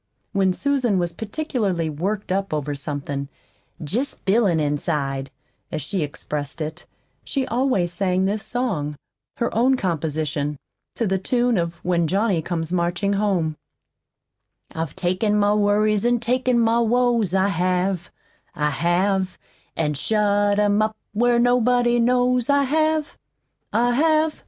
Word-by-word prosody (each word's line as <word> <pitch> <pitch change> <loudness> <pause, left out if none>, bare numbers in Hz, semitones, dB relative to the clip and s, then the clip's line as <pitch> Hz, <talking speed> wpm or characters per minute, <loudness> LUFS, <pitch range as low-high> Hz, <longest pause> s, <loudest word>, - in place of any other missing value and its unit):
When 195 -2 +3
Susan 255 -1 +1
was 175 -1 -1
particularly 210 - -2
"worked 185 +7 -3
up" 195 -3 -1
over 145 -1 -2
something, 140 -1 -4 0.5
"jest 235 - -3
b'ilin' 195 -4 +3
inside" 145 -2 -1 0.4
as 155 - -3
she 195 -3 -2
expressed 145 0 -5
it, 155 +2 -5 0.4
she 270 -2 -1
always 235 -9 0
sang 185 +1 +1
this 205 +2 -1
song 185 - -2 0.4
her 235 - -1
own 255 +4 +3
composition, 155 - -2 0.4
to 230 - -1
the 190 -1 0
tune 240 +4 +1
of 170 -2 -1
"When 170 -2 +2
Johnny 195 -1 +1
Comes 165 0 -3
Marching 180 +3 0
Home": 185 -7 0 1.2
"I've 160 -3 -4
taken 185 +4 +1
my 205 0 +3
worries, 210 0 +2
an' 240 0 +2
taken 250 +1 +1
my 230 0 +3
woes, 235 -4 +2
I 190 +1 +3
have, 180 0 0 0.5
I 150 0 0
have, 185 +4 0 0.4
An' 150 -2 0
shut 205 +4 +1
'em 205 0 +3
up 215 0 -1 0.2
where 240 +2 +3
nobody 245 0 +3
knows, 250 +1 +2
I 280 0 +4
have, 310 +2 0 0.5
I 240 +1 +2
have. 310 +3 +2
200 Hz, 135 wpm, -22 LUFS, 170-240 Hz, 1.2 s, I